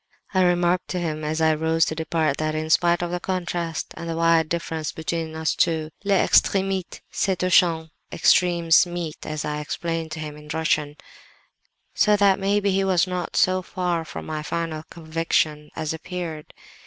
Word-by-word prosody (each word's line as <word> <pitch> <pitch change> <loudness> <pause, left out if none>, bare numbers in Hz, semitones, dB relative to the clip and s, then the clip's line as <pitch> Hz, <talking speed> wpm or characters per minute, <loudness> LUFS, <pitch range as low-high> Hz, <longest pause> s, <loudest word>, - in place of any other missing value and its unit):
I 185 - +3
remarked 175 0 +2
to 180 - -3
him, 155 -3 -3
as 155 +1 -2
I 160 0 +4
rose 160 +1 +2
to - - -2
depart, 160 -2 0
that, 155 0 -1
in 155 0 -2
spite 175 +1 +3
of 175 - -3
the 180 - -2
contrast 175 -3 -3
and 170 - -6
the 165 - -2
wide 165 -1 +3
differences 165 -2 -3
between 160 0 -4
us 160 0 0
two, 160 -2 0
les 200 -1 +2
extremites 195 -2 +1
se 190 -1 0
touchent 170 -3 +2 0.2
('extremes 170 -1 +4
meet,' 175 -3 -6
as 155 -1 -3
I 150 0 -2
explained 165 +1 -3
to 160 - -6
him 150 -1 -6
in 150 0 -13
Russian); 155 -2 0 1.0
so 210 -1 +4
that 200 -2 +4
maybe 200 +1 +1
he 195 +1 +1
was 185 -2 +3
not 180 -2 -4
so 185 0 +3
far 175 -2 -2
from 160 - -8
my 155 -1 -4
final 160 0 -3
conviction 160 -2 -1
as 155 -1 -2
appeared. 165 -2 -6
165 Hz, 175 wpm, -23 LUFS, 155-180 Hz, 1.0 s, I